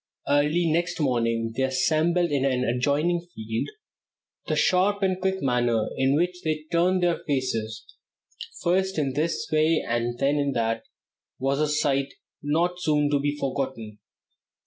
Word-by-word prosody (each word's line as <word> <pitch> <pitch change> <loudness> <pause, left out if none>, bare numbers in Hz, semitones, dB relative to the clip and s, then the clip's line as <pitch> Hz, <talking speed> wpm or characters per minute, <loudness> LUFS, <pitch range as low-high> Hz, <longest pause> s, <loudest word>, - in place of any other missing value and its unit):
Early 150 +4 +2
next 170 +2 0
morning 115 -5 0
they 135 - -1
assembled 155 +6 +2
in 140 -2 +1
an 130 -2 +1
adjoining 145 +8 +1 0.2
field. 110 +1 -3 0.8
The - - 0
sharp 200 +2 +2
and 185 -1 0
quick 190 -2 -1
manner 120 -4 +1
in 135 +1 +2
which 180 +3 0
they 155 -1 -2
turned 180 +2 +2
their 175 -1 +1
faces 115 -6 -2 0.8
first 190 +2 +1
in 140 -4 0
this 155 +4 -1
way 155 +1 +2
and 120 +1 -1
then 140 +3 +1
in 140 -1 0
that 115 -1 -1 0.5
was 135 +2 0
a 155 - +2
sight 140 -2 0 0.3
not 170 +5 0
soon 150 -3 +2
to 145 - +2
be 145 +1 -1
forgotten. 130 -6 -4
145 Hz, 145 wpm, -25 LUFS, 130-170 Hz, 0.8 s, Early